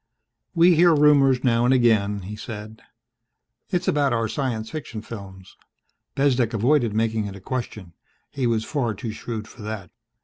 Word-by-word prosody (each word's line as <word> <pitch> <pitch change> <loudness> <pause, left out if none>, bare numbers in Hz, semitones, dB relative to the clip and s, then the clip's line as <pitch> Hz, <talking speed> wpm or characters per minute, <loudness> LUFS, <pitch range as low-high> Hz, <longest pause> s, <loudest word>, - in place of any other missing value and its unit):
"We 170 +2 +6
hear 170 0 +5
rumors 140 -3 +4
now 120 -2 +2
and 125 - +3
again," 110 -5 +2
he 105 +3 -7
said. 110 -1 -8 0.9
"It's 180 - -1
about 140 -3 +2
our 115 -1 0
science 110 -3 -3
fiction 120 -8 -6
films." 95 -4 -10 0.6
Bezdek 130 -4 +1
avoided 120 -1 +2
making 110 -1 0
it 100 - -8
a - - -10
question. 110 -5 -5 0.4
He 130 -3 -1
was 115 -2 0
far 120 -8 -2
too 115 +2 -5
shrewd 110 -1 -6
for 115 - -14
that. 105 -4 -6
115 Hz, 160 wpm, -23 LUFS, 110-135 Hz, 0.9 s, We